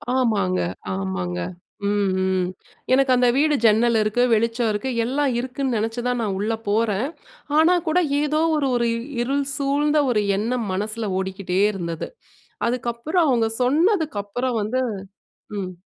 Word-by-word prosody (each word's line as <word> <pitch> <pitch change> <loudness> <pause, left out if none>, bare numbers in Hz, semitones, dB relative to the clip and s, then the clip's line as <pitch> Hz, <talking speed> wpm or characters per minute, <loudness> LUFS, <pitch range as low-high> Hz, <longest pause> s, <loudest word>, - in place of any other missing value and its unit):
ஆமாங்க, 215 - +1 0.4
ஆமாங்க. 90 -2 -3 0.5
ம், 205 -2 +1
ம். 185 -1 +1 0.5
எனக்கு 265 0 +4
அந்த 250 0 +3
வீடு 300 0 +3
ஜன்னல் 225 +1 +4
இருக்கு, 215 +3 +1
வெளிச்சம் 230 +1 +1
இருக்கு, 210 +5 -2 0.2
எல்லாம் 275 +2 0
இருக்குன்னு 260 0 -2
நெனச்சு 225 +3 -2
தான் 250 -1 0
நான் 205 -4 -1
உள்ளே 220 +2 -1
போறேன். 215 +2 +1 0.5
ஆனா 330 +3 +5
கூட 335 +3 +3 0.2
ஏதோ 300 +1 +1 0.2
ஒரு 280 -3 +1
ஒரு 235 -1 +1 0.3
இருள் 275 +3 0
சூழ்ந்த 290 +2 +1
ஒரு 210 -3 +2 0.2
எண்ணம் 230 +1 -1
மனசுல 215 +3 -2
ஓடிக்கிட்டே 190 -1 -2
இருந்தது. 170 -4 -4 0.6
அதுக்கப்புறம் 245 +8 0
அவங்க 230 -3 +2
சொன்னதுக்கப்புறம் 260 - +1
வந்து 235 +5 -1 0.8
ம். 185 -2 -4
235 Hz, 130 wpm, -22 LUFS, 205-270 Hz, 0.8 s, ஆனா